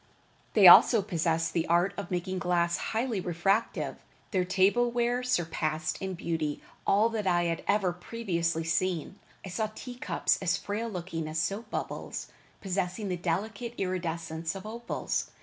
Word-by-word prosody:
They - - +6
also 225 -5 +9
possessed 165 -3 0
the 165 -2 0
art 175 +3 +3
of 200 -3 -5
making 185 +1 -2
glass 175 -1 +1
highly 225 -1 -1
refractive. 195 +6 0 0.3
Their 185 -3 +1
table 195 +6 +3
ware 240 +1 0
surpassed 160 -8 -1
in 190 -1 -3
beauty 160 -3 -2 0.3
all 210 +3 +5
that 215 -3 -2
I 175 -1 +3
had 170 -1 -1
ever 200 -3 +2
previously 170 -4 -2
seen. 175 +2 -1 0.3
I - - -6
saw 215 +4 -1
tea 250 - -7
cups - - +1
as 180 -1 +1
frail 210 +4 -3
looking 170 -5 -4
as 155 +1 -4
soap 200 +8 -2
bubbles, - - -4 0.3
possessing 190 +1 -2
the 180 - 0
delicate 205 +7 -3
iridescence 165 -3 -3
of 195 +1 -8
opals. 235 +2 -3
185 Hz, 150 wpm, -29 LUFS, 170-210 Hz, 0.3 s, also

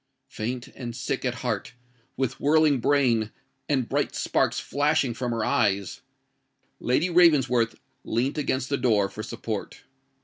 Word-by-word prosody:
Faint 120 +3 -4
and 120 -3 -7
sick - - -3
at - - -1
heart—with 125 +1 -5
whirling 150 -1 +4
brain—and 125 0 0
bright - - -1
sparks - - +1
flashing 145 -2 +1
from 120 +1 -3
her 115 -2 -1
eyes—Lady 135 - -2
Ravensworth 135 -9 +4 0.3
leant 130 +6 -1
against 130 -2 -1
the 140 - +1
door 105 -7 +2
for 105 - -7
support. 110 0 -5
125 Hz, 115 wpm, -26 LUFS, 115-140 Hz, 0.3 s, whirling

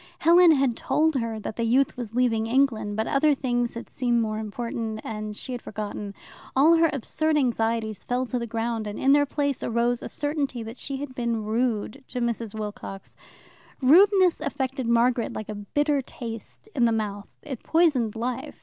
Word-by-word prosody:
Helen 340 +1 +6
had 270 -5 +2
told 310 +6 +1
her 230 -2 -2
that 215 - -6
the 230 - 0
youth 250 +4 +2
was 235 -3 -6
leaving 225 -3 +2
England, 230 -5 +1
but 220 +1 0
other 290 +3 +3
things 245 -3 -1
had 235 - -7
seemed 240 -2 0
more 215 -1 -1
important, 220 0 -4
and 215 -1 -5
she - - -5
had 245 -1 -4
forgotten. 205 -1 -6 0.4
All 295 +5 +6
her 330 0 +4
absurd 310 +3 0
anxieties 225 -5 0
fell 250 +1 -1
to 250 0 -2
the 235 - -4
ground, 225 -1 -2
and 205 - -5
in 270 +1 +4
their 290 0 +4
place 285 -2 -1
arose 235 +1 +1
the - - -7
certainty 290 -5 -2
that 225 +3 -8
she 275 +1 -4
had 275 -1 -6
been 235 -3 -2
rude 225 +3 -1
to 250 - -5
Mrs. 230 -2 -2
Wilcox. 205 -2 -7 0.6
Rudeness 365 +5 +5
affected 265 -3 -2
Margaret 235 0 +2
like 215 - -6
a - - -3
bitter 285 +8 0
taste 230 - -9
in 245 - +3
the 230 - +3
mouth. 205 -2 -3 0.2
It 270 -6 -6
poisoned 295 -10 +2
life. 245 +3 -4
240 Hz, 185 wpm, -25 LUFS, 225-275 Hz, 0.6 s, Helen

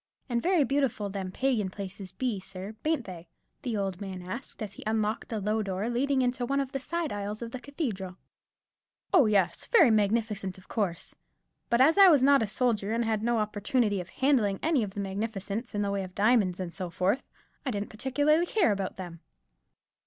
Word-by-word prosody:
"And 240 -3 0
very 355 -1 +3
beautiful 270 -8 0
them 190 -2 -4
Pagan 235 -3 0
places 190 -1 -7
be, 225 +1 -2
sir, 190 +1 -8
bain't 310 -6 0
they?" 175 -3 -9 0.3
the 235 -4 -2
old 195 -1 -2
man 190 -2 -6
asked, 220 +5 -6
as 205 -2 -6
he - - -10
unlocked 220 +1 -1
a 225 - -1
low 210 +2 0
door, 200 +2 -2
leading 260 +2 +1
into 245 0 0
one 275 +3 0
of 270 -1 -2
the 270 - -2
side 330 +3 -3
aisles 205 +2 -4
of 230 - -6
the 260 - -5
cathedral. 225 - -4 1.0
"Oh 265 - +6
yes, 190 -5 +1
very 335 - +6
magnificent, 210 -2 +1
of 185 - -17
course. 190 -6 -2 0.6
But 235 +1 +3
as 320 +8 +5
I 395 - +10
was 295 -7 +6
not 280 -1 +6
a 220 - 0
soldier, 215 -1 0
and 230 +1 0
had 220 -1 0
no 235 +1 +1
opportunity 210 0 0
of 180 - -11
handling 225 -6 +2
any 315 -5 +3
of 205 -1 -4
the - - -4
magnificence 205 +2 -4
in 205 - +1
the 200 - -1
way 200 0 -1
of 185 -1 -10
diamonds 205 -4 +3
and 175 -2 -4
so 185 -2 -5
forth, 190 +9 +1 0.4
I 275 - -2
didn't 205 -3 -3
particularly 290 +9 +2
care 375 - +3
about 195 -2 -3
them." 175 -3 -7
215 Hz, 200 wpm, -29 LUFS, 195-255 Hz, 1.0 s, I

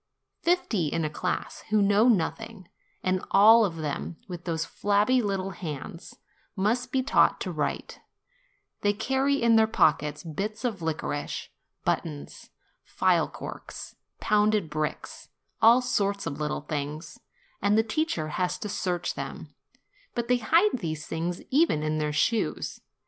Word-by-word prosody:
Fifty 335 - +1
in 165 +2 -1
a 150 - -3
class, 180 +4 -3
who 215 0 +3
know 205 +3 +4
nothing; 220 -1 0 0.4
and 185 0 0
all 220 +3 +7
of 185 -6 -1
them 155 +1 -4
with 175 -2 -8
those 165 -2 -1
flabby 205 +5 +2
little 195 -3 -2
hands, 165 0 -7 0.4
must 235 +6 0
be 260 -1 +1
taught 275 - +3
to - - -3
write; - - -3 0.8
they 205 0 +2
carry 265 +6 +1
in 230 -1 +4
their 220 0 +5
pockets 150 -8 +2
bits 205 - -4
of 215 -7 -2
licorice, 155 -2 -3 0.4
buttons, 70 -1 -3 0.3
phial - - +2
corks, - - -8 0.2
pounded 210 -5 +2
brick, 155 0 -2 0.5
all 235 +3 +7
sorts 200 -4 0
of 145 -2 -4
little 150 -1 -2
things, 150 +2 -5 0.4
and 205 +2 +3
the 220 - +4
teacher 220 - -1
has 180 +3 -1
to 210 - -5
search 180 -3 -2
them; - - -7 0.6
but 240 -1 -2
they 250 - +3
hide 330 - +3
these 155 -4 -4
objects 170 +2 -2
even 275 - +3
in 155 0 -1
their 150 0 -1
shoes. 220 +9 0
200 Hz, 145 wpm, -27 LUFS, 160-225 Hz, 0.8 s, all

